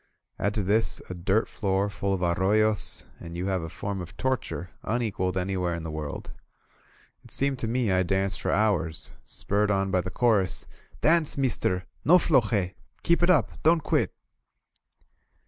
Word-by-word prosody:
Add 100 +1 0
to 105 - 0
this 105 +4 +1
a - - -3
dirt 95 +5 0
floor 100 -1 0
full 100 -1 -2
of 90 - -4
arroyos, 100 +4 +3
and 85 0 -8
you 90 - -3
have 95 -2 0
a 80 - -6
form 100 +3 -4
of 90 - -10
torture 125 -9 -2
un 120 +2 -1
equaled 95 -4 -2
anywhere 90 -2 -1
in 85 - -6
the 80 - -5
world. 75 -2 -6 0.9
It - - -16
seemed 135 -1 +1
to 115 - -2
me 120 -2 0
I 95 0 +3
danced 95 +1 -1
for - - -2
hours, 95 -7 +1
spurred 105 +1 -1
on 95 -1 +1
by 95 -2 +2
the 90 - -5
chorus: 105 -2 +1 0.3
^*Dance, 160 -2 +3
meester! 105 -8 0 0.2
No 175 +4 +7
floje! 110 - +2 0.3
Keep 170 0 +2
it 175 - +3
up! 180 - +2
Don't 160 +1 +4
quit - - +1
100 Hz, 170 wpm, -26 LUFS, 90-115 Hz, 0.9 s, No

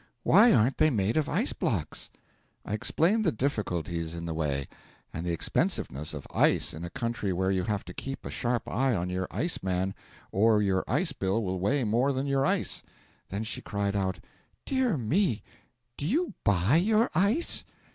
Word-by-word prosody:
Why 215 +7 +7
aren't 120 +5 +3
they 155 - +5
made 105 -5 0
of 155 -2 +1
ice - - +1
blocks?' - - -2 0.6
I 105 - -4
explained 175 - +2
the 170 - +3
difficulties 85 - -2
in 85 0 -5
the 80 - -3
way, 70 -4 -1 0.5
and 80 - -4
the - - +1
expensiveness 75 -3 -1
of - - -7
ice - - +3
in 80 - -7
a 85 - -4
country 115 -3 -2
where 95 +1 0
you 95 -2 0
have 105 -2 -2
to - - -8
keep 135 0 -6
a - - -5
sharp 120 -2 -1
eye 130 0 +1
on 90 0 -2
your 90 0 -2
ice 170 +2 -2
man 95 +1 -1 0.4
or 110 +2 +4
your 95 -2 +1
ice 150 +5 +1
bill 100 -1 0
will 95 -1 -2
weigh 130 +9 +1
more 120 +6 +2
than 135 +1 -1
your 135 0 +2
ice. - - 0 0.5
Then 100 +3 -3
she 110 - -4
cried 100 -1 -2
out: 95 -2 -1 0.5
'Dear 260 - +1
me, 130 - +1 0.5
do 145 - -3
you 315 - 0
buy 100 - +3
your 215 +6 +3
ice?' 200 - +2
110 Hz, 185 wpm, -28 LUFS, 95-145 Hz, 0.6 s, Why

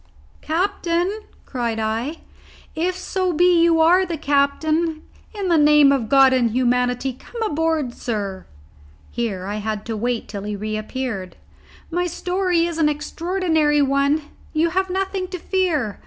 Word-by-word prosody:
"Captain," 350 +3 -1 0.3
cried 235 -3 -3
I, 225 +8 -2 0.5
"if 355 +3 -1
so 370 0 -1
be 350 +1 +4
you 335 -1 +4
are 355 +4 +5
the 340 -3 -3
captain, 310 +3 0 0.3
in 400 -2 -3
the 335 -3 +4
name 295 -1 +6
of 250 -6 0
God 270 -1 +6
and 245 -3 +2
humanity 250 +2 0
come 465 - -11
aboard, 320 - 0
sir." 200 -7 -4 0.6
Here 215 -6 -3
I 205 +2 -3
had 215 0 -4
to 225 - -3
wait 235 +2 -2
till 200 - -6
he 205 +1 -4
reappeared. 215 -2 -4 0.6
"My 355 +1 0
story 360 0 0
is 335 -1 -4
an 305 -2 +4
extraordinary 315 -1 0
one. 280 +2 +1 0.3
You 330 +2 +1
have 380 +1 0
nothing 380 0 -2
to 365 0 -6
fear. 330 - -1
300 Hz, 145 wpm, -21 LUFS, 240-345 Hz, 0.6 s, name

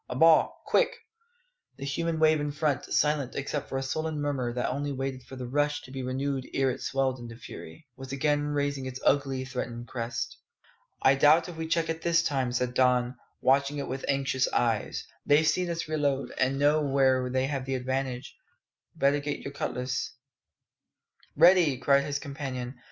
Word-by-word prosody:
A - - -4
ball, 160 +3 +4
quick!" - - +2 0.8
The 140 - -6
human 165 +4 -1
wave 155 -1 +4
in 145 0 -2
front, 145 -3 0
silent 150 -3 +1
except 140 +1 -3
for 135 - -2
a 135 - -2
sullen 155 +3 -2
murmur 140 -4 -1
that 125 0 -1
only 145 +2 -2
waited 135 -1 -3
for 130 - -11
the 130 -1 -5
rush 145 +3 0
to 130 - -12
be 135 0 -5
renewed 130 +1 -2
ere 135 -1 +2
it - - -7
swelled 135 -1 0
into 115 -1 -8
fury, 120 - -11
was 135 -1 -9
again 145 +1 +1
raising 145 -2 -1
its 130 0 -6
ugly, 135 -2 +2
threatening 120 -2 -5
crest. 115 -1 -4 0.6
"I 130 - +7
doubt 155 +5 +5
if 175 - -8
we 160 0 -4
check 165 0 +1
it 165 0 -3
this 170 0 +3
time," 135 -4 0
said 125 0 -1
Don, 125 -1 +2 0.3
watching 140 +2 +3
it 140 - -3
with 130 +1 -4
anxious 135 -1 +1
eyes; 115 -3 0 0.2
"they've 150 +2 +4
seen 175 +3 +1
us 165 -2 -3
reload, 145 -3 0
and 135 +1 +2
know 145 +2 +3
where 135 -2 +2
they 130 +1 +1
have 135 -2 -3
the 135 0 -1
advantage. 130 0 -3 0.6
Better 140 +1 +3
get 145 0 -4
your 140 - -7
cutlass 125 -3 -3 0.6
" - - -63 0.5
"Ready!" 170 -3 +6
cried 140 +2 +3
his 145 -1 -1
companion. 135 -3 -6
135 Hz, 185 wpm, -28 LUFS, 130-145 Hz, 0.8 s, I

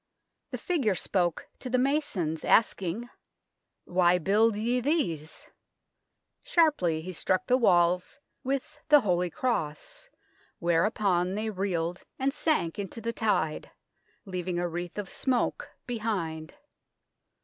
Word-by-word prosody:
The - - -4
figure 270 - 0
spoke 175 -2 -1
to 255 - -6
the 255 - +2
masons, 250 - 0
asking, 215 0 +2 0.4
" - - -55 0.2
Why 180 0 +3
build 210 +6 +3
ye 235 +4 0
these? 205 - -1 0.5
" - - -54 0.2
Sharply 185 - +2
he 185 - -5
struck 185 +2 0
the 250 - +3
walls 180 -4 +3 0.2
with 270 0 -3
the 295 -1 +8
holy 180 -4 +1
cross, 255 - -3 0.5
whereupon 180 +1 +1
they 215 +1 -2
reeled 180 -3 -2
and 270 +1 0
sank 250 - 0
into 200 +2 -5
the 230 +1 -3
tide, 205 -9 0 0.6
leaving 180 -2 -3
a 175 0 0
wreath 175 +2 -5
of 205 -2 -3
smoke 255 +2 -1 0.2
behind. 190 -10 -3
195 Hz, 125 wpm, -28 LUFS, 175-245 Hz, 0.6 s, the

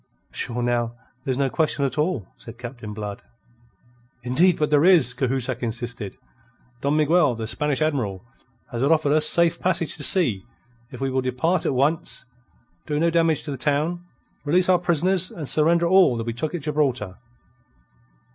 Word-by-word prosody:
"Sure, 120 0 -3
now, 120 -1 -1 0.3
there's 130 -2 -1
no 140 -1 +1
question 150 0 0
at 135 - -3
all," 150 - -1
said 115 0 -12
Captain 120 -3 -8
Blood. 105 -1 -6 1.0
"Indeed, 160 +9 +3
but 150 -1 -1
there 145 0 +4
is," 165 -9 +5
Cahusac 130 -1 -1
insisted. 120 -3 -5 0.6
"Don 140 +2 +1
Miguel, 155 -3 +3
the 115 0 -5
Spanish 145 +6 -1
Admiral, 120 -12 -2 0.5
have 120 - -4
offer 155 -1 +2
us 155 0 +5
safe 170 0 +3
passage 180 -3 -1
to 150 - -5
sea 135 - +4 0.5
if - - -10
we 135 -1 -1
will 130 0 0
depart 130 +8 -1
at 135 - 0
once, 145 +5 0 0.6
do 150 -1 -1
no 170 +1 +2
damage 165 -2 +1
to 150 - -5
the 135 - -5
town, 150 +6 -1 0.4
release 180 +5 +2
our 180 -1 +4
prisoners, 180 +2 +1
and 155 -5 -7
surrender 165 +4 +2
all 180 -8 +4
that 115 - -4
we 115 - -3
took 150 +8 -3
at 170 - -4
Gibraltar." 135 -10 -1
145 Hz, 165 wpm, -23 LUFS, 120-165 Hz, 1.0 s, is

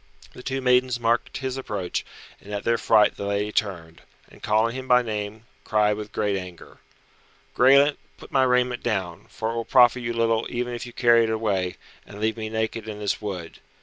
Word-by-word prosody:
The - - -11
two 135 +1 -3
maidens 125 -1 +2
marked 115 0 0
his 130 -1 -4
approach, 105 -8 -3 0.4
and 105 - -13
at 105 0 -3
their 115 0 +1
fright 110 -1 +4
the 100 - -4
lady 100 +1 -1
turned, 85 -7 -3 0.3
and - - -17
calling 110 +2 +1
him 130 0 -6
by 125 -1 +5
name, 105 0 -5 0.2
cried 105 -1 +2
with 105 0 -7
great 105 -2 0
anger, 90 -2 -9 0.8
"Graelent, 140 +3 +5 0.2
put - - -14
my 135 - +3
raiment 125 -1 +2
down, 85 -3 -3
for 110 0 -3
it - - -5
will 115 0 -2
profit 125 0 +5
you 120 0 -3
little 115 -1 +1
even 120 0 -3
if 120 +1 -6
you - - -9
carry 120 -1 +4
it - - -3
away, 100 -5 -1 0.3
and 100 - -12
leave 110 +1 0
me 110 -1 -5
naked 110 0 -3
in 105 -1 -6
this 105 -1 -2
wood. 90 -6 -6
110 Hz, 200 wpm, -24 LUFS, 105-125 Hz, 0.8 s, by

